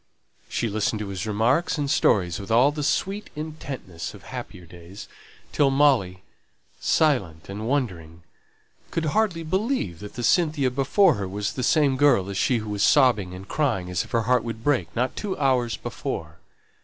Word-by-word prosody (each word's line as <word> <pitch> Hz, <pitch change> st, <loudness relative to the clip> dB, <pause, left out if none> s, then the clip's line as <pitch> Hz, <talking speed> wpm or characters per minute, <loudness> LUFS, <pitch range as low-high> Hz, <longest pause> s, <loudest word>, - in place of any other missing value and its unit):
She 120 Hz, -, -1 dB
listened 110 Hz, +1 st, -1 dB
to 105 Hz, -, -5 dB
his 95 Hz, +1 st, -4 dB
remarks 125 Hz, +11 st, +1 dB
and 145 Hz, -1 st, -1 dB
stories 95 Hz, -, +2 dB
with 100 Hz, -, -8 dB
all 125 Hz, +6 st, +5 dB
the 150 Hz, 0 st, -5 dB
sweet 195 Hz, +7 st, -1 dB
intentness 140 Hz, -, -6 dB
of -, -, -14 dB
happier 90 Hz, -1 st, -8 dB
days, 85 Hz, +3 st, -12 dB, 0.4 s
till 145 Hz, -2 st, +3 dB
Molly, 130 Hz, -10 st, +2 dB, 0.6 s
silent 95 Hz, -, +1 dB
and 105 Hz, +3 st, -5 dB
wondering, 90 Hz, -, -3 dB, 0.7 s
could 165 Hz, -, -2 dB
hardly 200 Hz, -7 st, +1 dB
believe 185 Hz, -, -1 dB
that 105 Hz, -, -10 dB
the 120 Hz, -, -4 dB
Cynthia 150 Hz, -1 st, +2 dB
before 145 Hz, +8 st, +3 dB
her 100 Hz, -2 st, -4 dB
was 100 Hz, +2 st, -3 dB
the 130 Hz, -, -4 dB
same 140 Hz, 0 st, +3 dB
girl 115 Hz, -9 st, +3 dB
as 95 Hz, -, -4 dB
she 125 Hz, -, +2 dB
who 110 Hz, -1 st, -5 dB
was 100 Hz, -1 st, -2 dB
sobbing 105 Hz, -9 st, +3 dB
and 95 Hz, +2 st, -10 dB
crying 95 Hz, -13 st, -1 dB
as 90 Hz, -, 0 dB
if -, -, -14 dB
her 115 Hz, -1 st, +1 dB
heart 125 Hz, 0 st, +2 dB
would 115 Hz, -1 st, -6 dB
break, 145 Hz, -2 st, +1 dB
but 125 Hz, +2 st, -1 dB
two 200 Hz, -3 st, -4 dB
hours 130 Hz, -4 st, +1 dB
before. -, -, -6 dB
120 Hz, 175 wpm, -24 LUFS, 100-145 Hz, 0.7 s, all